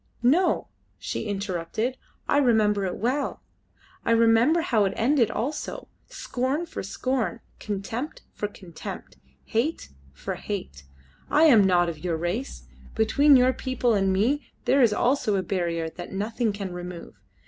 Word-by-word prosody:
"No," 335 Hz, +9 st, +3 dB, 0.3 s
she 225 Hz, -, -4 dB
interrupted, 200 Hz, +4 st, -2 dB, 0.3 s
"I -, -, +3 dB
remember 215 Hz, -6 st, +3 dB
it 185 Hz, -, -2 dB
well. 255 Hz, +7 st, -2 dB, 0.6 s
I -, -, -2 dB
remember 230 Hz, +8 st, +4 dB
how 230 Hz, -, +2 dB
it 195 Hz, -, -1 dB
ended 245 Hz, -1 st, +3 dB
also. 295 Hz, +6 st, -4 dB, 0.2 s
Scorn 280 Hz, -, -2 dB
for 335 Hz, -, -6 dB
scorn, 230 Hz, +2 st, -2 dB, 0.2 s
contempt 220 Hz, +8 st, -5 dB
for 210 Hz, -, -3 dB
contempt, 185 Hz, -4 st, -9 dB, 0.3 s
hate 250 Hz, +9 st, -1 dB, 0.2 s
for 65 Hz, -, -5 dB
hate. 65 Hz, +1 st, -6 dB, 0.4 s
I 300 Hz, -, +4 dB
am 245 Hz, -10 st, +7 dB
not 175 Hz, -2 st, +3 dB
of 165 Hz, -2 st, -5 dB
your 170 Hz, -3 st, -1 dB
race. 180 Hz, +11 st, -3 dB, 0.3 s
Between 275 Hz, +7 st, +5 dB
your 255 Hz, 0 st, +5 dB
people 255 Hz, -3 st, 0 dB
and 195 Hz, -2 st, +2 dB
me 235 Hz, +10 st, +1 dB, 0.2 s
there 275 Hz, +1 st, +4 dB
is 235 Hz, -4 st, +5 dB
also 245 Hz, -1 st, +1 dB
a 190 Hz, -, 0 dB
barrier 170 Hz, -3 st, -1 dB
that 175 Hz, +2 st, -8 dB
nothing 220 Hz, +3 st, -1 dB
can 200 Hz, -3 st, -5 dB
remove. 180 Hz, -1 st, -7 dB
220 Hz, 145 wpm, -25 LUFS, 190-260 Hz, 0.6 s, am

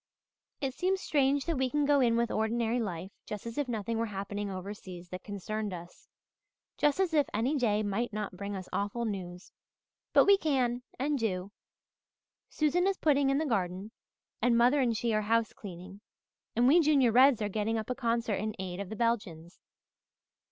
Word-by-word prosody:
"It 270 Hz, -2 st, -1 dB
seems 375 Hz, +6 st, 0 dB
strange 280 Hz, -4 st, +1 dB
that 330 Hz, -5 st, -1 dB
we 260 Hz, -1 st, +1 dB
can 295 Hz, +2 st, +1 dB
go 290 Hz, 0 st, +4 dB
in 235 Hz, -3 st, +3 dB
with 235 Hz, 0 st, +1 dB
ordinary 230 Hz, +2 st, 0 dB
life 190 Hz, -4 st, -4 dB, 0.2 s
just 210 Hz, 0 st, -6 dB
as 230 Hz, +4 st, -4 dB
if 290 Hz, -, 0 dB
nothing 225 Hz, -1 st, -2 dB
were 230 Hz, -, 0 dB
happening 200 Hz, 0 st, -4 dB
overseas 185 Hz, -2 st, -7 dB
that 185 Hz, +1 st, -7 dB
concerned 205 Hz, 0 st, -4 dB
us, 175 Hz, 0 st, -12 dB, 0.7 s
just 295 Hz, +3 st, +2 dB
as 370 Hz, -4 st, +1 dB
if 295 Hz, -2 st, +3 dB
any 245 Hz, +8 st, +1 dB
day 215 Hz, -6 st, +1 dB
might 210 Hz, +4 st, -1 dB
not 210 Hz, -3 st, -4 dB
bring 200 Hz, +2 st, -5 dB
us 185 Hz, -1 st, -6 dB
awful 205 Hz, +4 st, -1 dB
news. 180 Hz, -4 st, -6 dB, 0.6 s
But -, -, +6 dB
we 400 Hz, -1 st, +6 dB
can 255 Hz, -6 st, +1 dB, 0.2 s
and 285 Hz, +2 st, 0 dB
do. 195 Hz, -3 st, -2 dB, 1.0 s
Susan 330 Hz, +5 st, +1 dB
is 390 Hz, -1 st, +1 dB
putting 285 Hz, -3 st, +3 dB
in 275 Hz, -, +2 dB
the 315 Hz, -, 0 dB
garden, 195 Hz, -4 st, -2 dB, 0.5 s
and 240 Hz, -1 st, +3 dB
mother 250 Hz, +5 st, +4 dB
and 235 Hz, -4 st, +1 dB
she 230 Hz, +1 st, 0 dB
are 215 Hz, -, +2 dB
housecleaning, 205 Hz, -4 st, -3 dB, 0.5 s
and 240 Hz, +2 st, +4 dB
we 310 Hz, +6 st, +6 dB
Junior 285 Hz, -7 st, +4 dB
Reds 255 Hz, +1 st, +6 dB
are 210 Hz, -, -1 dB
getting 215 Hz, +2 st, -1 dB
up 220 Hz, +3 st, -3 dB
a -, -, +2 dB
concert 235 Hz, -4 st, 0 dB
in 215 Hz, +1 st, -3 dB
aid 185 Hz, -1 st, -5 dB
of 200 Hz, -2 st, -5 dB
the 220 Hz, -, -5 dB
Belgians. 200 Hz, -8 st, -2 dB
230 Hz, 185 wpm, -30 LUFS, 200-265 Hz, 1.0 s, But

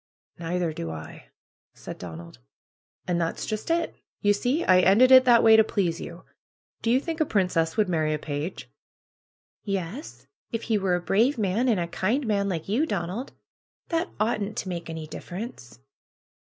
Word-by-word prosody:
^^Neither 170 Hz, -1 st, -1 dB
do 85 Hz, -, -5 dB
I," 80 Hz, 0 st, -9 dB, 0.5 s
said -, -, -9 dB
Donald. 85 Hz, -5 st, -9 dB, 0.7 s
^^And 175 Hz, -1 st, 0 dB
that's 165 Hz, -1 st, -2 dB
]ust 215 Hz, -, -4 dB
it! 335 Hz, 0 st, 0 dB, 0.2 s
You 205 Hz, -1 st, +3 dB
see 250 Hz, +10 st, 0 dB
I 185 Hz, 0 st, +6 dB
ended 210 Hz, +8 st, +5 dB
it 260 Hz, 0 st, +9 dB
that 240 Hz, -2 st, +6 dB
way 225 Hz, -1 st, +8 dB
to 220 Hz, -, +7 dB
please 180 Hz, -6 st, -1 dB
you. 170 Hz, +2 st, -9 dB, 0.6 s
Do 230 Hz, -, -1 dB
you 250 Hz, +3 st, +4 dB
think 325 Hz, +3 st, -4 dB
a -, -, +7 dB
princess 180 Hz, -, 0 dB
would 215 Hz, -2 st, +3 dB
marry 160 Hz, -3 st, 0 dB
a 155 Hz, -, 0 dB
page?" 150 Hz, +3 st, -5 dB, 1.0 s
'^Yes, 195 Hz, -, -4 dB, 0.3 s
if 230 Hz, -1 st, -3 dB
he 220 Hz, -2 st, +1 dB
were 190 Hz, -2 st, +1 dB
a -, -, 0 dB
brave 230 Hz, +10 st, +2 dB
man, 215 Hz, +4 st, +1 dB
and 215 Hz, -6 st, +2 dB
a 170 Hz, -, -1 dB
kind 225 Hz, +11 st, -1 dB
man, 200 Hz, -2 st, 0 dB
like 165 Hz, -4 st, -3 dB
you, 245 Hz, +11 st, +1 dB
Donald. 220 Hz, -, -3 dB, 0.6 s
That 330 Hz, +1 st, 0 dB
oughtn't 215 Hz, -1 st, -1 dB
to 190 Hz, -, -3 dB
make 170 Hz, -2 st, -5 dB
any 160 Hz, -1 st, -5 dB
difference." 175 Hz, -, -8 dB
195 Hz, 175 wpm, -26 LUFS, 170-230 Hz, 1.0 s, it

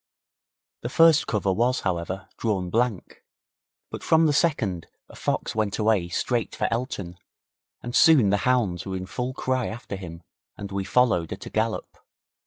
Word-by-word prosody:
The 120 Hz, -, -4 dB
first 165 Hz, +2 st, +5 dB
cover 100 Hz, -3 st, 0 dB
was, 120 Hz, +5 st, +1 dB
however, 95 Hz, 0 st, -3 dB
drawn 95 Hz, -6 st, -1 dB
blank, 115 Hz, -5 st, -1 dB, 0.7 s
but -, -, -6 dB
from 160 Hz, 0 st, +4 dB
the 150 Hz, -, +3 dB
second 110 Hz, -, 0 dB, 0.2 s
a -, -, -15 dB
fox -, -, -2 dB
went 110 Hz, -2 st, -1 dB
away 105 Hz, -5 st, +1 dB
straight 120 Hz, +6 st, -1 dB
for -, -, 0 dB
Elton, 100 Hz, -7 st, -4 dB, 0.6 s
and 120 Hz, +1 st, -5 dB
soon 135 Hz, -12 st, +6 dB
the 100 Hz, -, +3 dB
hounds 110 Hz, -7 st, +1 dB
were 95 Hz, -1 st, -4 dB
in 95 Hz, -, -5 dB
full 125 Hz, +6 st, -4 dB
cry 130 Hz, -2 st, -1 dB
after 110 Hz, -2 st, -6 dB
him 85 Hz, -3 st, -9 dB, 0.3 s
and 100 Hz, -1 st, -7 dB
we 100 Hz, -1 st, -2 dB
followed 105 Hz, -7 st, +2 dB
at -, -, -7 dB
a -, -, -8 dB
gallop. 110 Hz, 0 st, -2 dB
110 Hz, 165 wpm, -25 LUFS, 95-125 Hz, 0.7 s, soon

